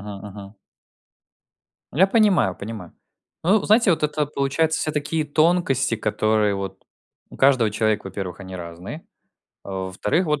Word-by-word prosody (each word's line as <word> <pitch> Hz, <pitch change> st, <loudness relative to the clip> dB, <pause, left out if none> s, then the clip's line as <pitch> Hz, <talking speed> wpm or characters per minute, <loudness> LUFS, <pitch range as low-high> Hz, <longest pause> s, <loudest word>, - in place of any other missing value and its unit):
мгм 100 Hz, -1 st, -8 dB
мгм. 100 Hz, 0 st, -11 dB, 1.4 s
Я 180 Hz, +8 st, +4 dB
понимаю, 195 Hz, -, +3 dB
понимаю. 100 Hz, -4 st, -8 dB, 0.5 s
Ну, 195 Hz, +4 st, +4 dB
знаете, 215 Hz, 0 st, +4 dB
вот 165 Hz, -, +1 dB
это 150 Hz, 0 st, 0 dB
получается, 150 Hz, +3 st, 0 dB
все 155 Hz, -, -1 dB
такие 150 Hz, +2 st, -1 dB
тонкости, 150 Hz, -5 st, +2 dB
которые 110 Hz, -1 st, +1 dB
вот 95 Hz, -1 st, -5 dB, 0.5 s
у -, -, -12 dB
каждого 130 Hz, -5 st, +4 dB
человека, 110 Hz, -1 st, 0 dB
во-первых, 95 Hz, -1 st, -6 dB
они 95 Hz, -1 st, -8 dB
разные, 85 Hz, -, -8 dB, 0.6 s
а, -, -, -8 dB, 0.2 s
во-вторых, 105 Hz, -, 0 dB
вот, 150 Hz, -2 st, 0 dB
125 Hz, 140 wpm, -23 LUFS, 100-155 Hz, 1.4 s, Я